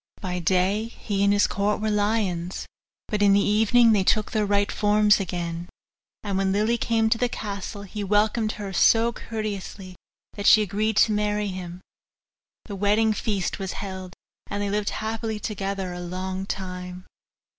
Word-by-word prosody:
By 180 -2 -3
day 185 +5 +1
he 205 -3 -3
and 200 - +4
all - - +3
his 205 - +4
court 205 +2 0
were 215 0 -1
lions, 205 -4 -1 0.4
but 210 -1 -2
in 200 -1 +5
the 200 - +5
evening 220 +3 +4
they 205 -3 +3
took 215 +2 +1
their 215 -3 0
right 200 0 +1
forms 210 0 +3
again. 175 -2 -4 0.5
And 200 -2 -1
when 195 -1 +1
Lily 215 +4 +1
came 225 -1 +1
to 225 - +2
the 245 - +1
castle, 200 -2 -5
he 205 +1 -6
welcomed 215 +2 +1
her 200 -2 -6
so 230 +5 +4
courteously 200 -4 -6 0.4
that 205 -1 -2
she 215 - +7
agreed 210 +2 -1
to 220 - -3
marry 210 0 0
him. 180 -1 -7 0.8
The 205 - -6
wedding 210 +3 +2
feast 210 -4 -2
was 190 -1 -4
held, 190 -2 -7 0.3
and 205 - -3
they 200 - -2
lived 210 0 0
happily 220 0 -3
together 195 -3 -3
a 175 - -6
long 185 +2 -4
time. 180 -1 -6
205 Hz, 170 wpm, -25 LUFS, 190-215 Hz, 0.8 s, she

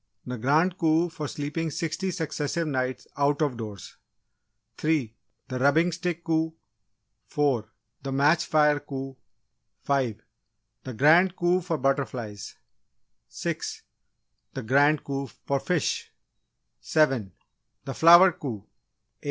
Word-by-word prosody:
The 125 -1 -5
Grand 155 +9 +2
Coup 165 +1 +2
for 160 -2 -5
sleeping 150 +4 -3
sixty 165 +4 -3
successive 165 -2 -2
nights 130 -3 -2
out 145 0 +2
of 140 -4 0
doors 105 -5 -8 0.8
3. 150 -8 0 0.3
The 130 0 -4
Rubbing 155 +6 +3
Stick 170 0 -3
Coup 160 -1 0 0.7
4. 135 -7 0 0.3
The 135 0 -5
Match 150 +5 +3
Fire 150 -1 +3
Coup 135 -2 -7 0.7
5. 125 -6 -1 0.6
The 130 -3 -6
Grand 170 - +5
Coup 175 +1 +2
for 170 -2 -2
butterflies 125 -7 -2 0.7
6. - - -5 0.7
The - - -4
Grand 145 +6 +3
Coup 140 -1 -4
for 140 +1 -3
fish 175 +1 -1 0.7
7. 135 -10 +1 0.5
The 135 - -4
Flower 175 +5 +8
Coup 125 - -6
8. - - -38
145 Hz, 120 wpm, -26 LUFS, 135-165 Hz, 0.8 s, Flower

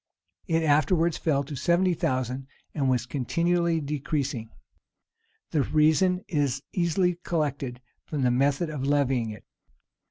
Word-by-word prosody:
[] - - -51
It 165 -2 +1
afterwards 160 +3 +2
fell 140 -4 +1
to 140 +1 -7
seventy 175 +5 +2
thousand, 130 -3 -2 0.3
and 140 -4 0
was 125 -2 +1
continually 170 +6 0
decreasing.[] 140 -5 -3 1.0
The 150 - +2
reason 160 +6 +3
is 140 -4 0
easily 180 0 +1
collected 140 -6 -2 0.2
from 145 -4 -3
the 125 - +3
method 140 +6 +1
of 145 -3 -4
levying 135 -5 +1
it. 105 -1 -9
145 Hz, 130 wpm, -26 LUFS, 130-170 Hz, 1.0 s, reason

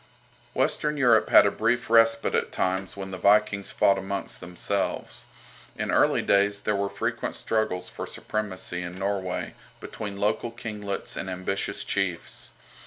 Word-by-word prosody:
Western 150 +2 0
Europe 125 -4 +4
had - - +8
a - - +3
brief 120 +2 0
respite 115 0 +4
at - - 0
times 95 +1 -1
when 95 -1 -6
the 95 - -6
Vikings 100 -1 +3
fought 100 -1 +3
amongst 95 +1 -5
themselves. 90 +3 -3 0.5
In - - -2
early - - +3
days 100 0 +3
there 105 - 0
were 100 0 0
frequent - - -3
struggles 110 -5 -1
for - - -6
supremacy 95 -4 -4
in 90 0 -6
Norway, 95 -2 -2 0.3
between 105 -2 -6
local 105 +3 0
kinglets 105 -4 -5
and 95 - -4
ambitious 95 +1 -2
chiefs. 90 -4 -3
100 Hz, 145 wpm, -26 LUFS, 95-110 Hz, 0.5 s, had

